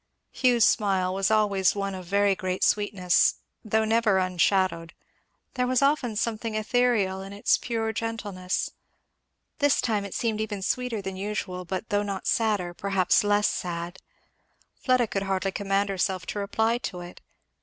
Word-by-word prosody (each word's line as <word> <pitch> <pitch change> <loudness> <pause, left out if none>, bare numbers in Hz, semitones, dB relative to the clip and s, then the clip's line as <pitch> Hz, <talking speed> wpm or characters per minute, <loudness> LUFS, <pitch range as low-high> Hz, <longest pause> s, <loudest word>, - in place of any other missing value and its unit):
Hugh's 245 -3 +3
smile 190 -3 +2
was 195 +1 +1
always 205 -3 +2
one 195 -1 -2
of 185 -1 -7
very 200 +1 +3
great 185 -1 -3
sweetness, 195 -4 +2 0.3
though 220 0 +1
never 220 -3 +2
unshadowed; 185 -2 +1 0.6
there 250 -1 0
was 255 +1 +2
often 275 -6 +1
something 225 0 -2
ethereal 215 -4 +1
in 195 +1 -8
its 200 - +2
pure 225 -2 -2
gentleness. 210 -5 -3 0.9
This 285 -1 +3
time 215 -3 0
it 200 - -7
seemed 220 -3 -1
even 205 -3 -4
sweeter 245 -2 -2
than 190 -1 -5
usual, 190 -2 -4
but 185 +5 -4
though 205 0 +1
not 200 -2 -4
sadder, 210 -6 +1
perhaps 195 0 +2
less 205 0 +3
sad, 175 +1 -4 0.7
Fleda 255 -2 +1
could 200 -2 -3
hardly 195 0 0
command 200 0 0
herself 185 -1 -1
to 205 - -4
reply 220 +4 0
to 180 -7 -5
it. 175 0 -11
205 Hz, 155 wpm, -26 LUFS, 190-220 Hz, 0.9 s, Hugh's